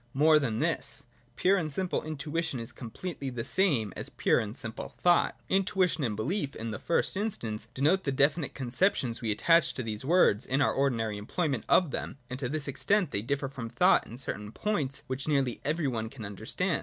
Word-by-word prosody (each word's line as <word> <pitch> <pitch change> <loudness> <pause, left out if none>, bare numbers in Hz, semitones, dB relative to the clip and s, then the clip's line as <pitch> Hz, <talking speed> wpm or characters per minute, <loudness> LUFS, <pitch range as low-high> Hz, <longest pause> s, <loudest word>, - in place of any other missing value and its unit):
More 155 +2 +6
than 115 -7 -1
this. - - -1 0.3
Pure 195 +2 +3
and 155 -3 -2
simple 185 +4 +1
intui 155 +2 -3
tion 150 -6 -3
is 115 - -6
completely 140 +4 -6
the 120 -3 -4
same 135 - +1
as - - -5
pure - - +2
and 110 +3 -4
simple 110 -2 -7
thought. 175 -1 +4
Intuition 185 -4 +1
and 110 -5 -1
belief, 140 - -2
in 115 0 -4
the 110 - -5
first 170 - 0
instance, 115 - -3
denote 160 +8 +3
the 140 - 0
definite 140 +3 +2
conceptions 130 - 0
we 115 - -1
attach 165 +9 +3
to 130 - -3
these 110 0 -4
words 140 - +4
in 130 +2 +1
our 140 - +3
ordinary 115 -6 0
employment 135 - -2
of 175 -6 +4
them: - - -4
and 130 - -4
to 125 -3 -2
this 150 0 -1
extent 185 +4 +1
they 100 - 0
differ 135 +4 -1
from 125 -4 -6
thought 180 +9 +4
in 115 - -9
certain 105 -5 -4
points 150 - -1
which 130 +3 -4
nearly 135 -5 +1
every 155 0 0
one 110 -4 -2
can 115 -3 -8
understand. 100 -1 -2
140 Hz, 200 wpm, -29 LUFS, 115-165 Hz, 0.3 s, More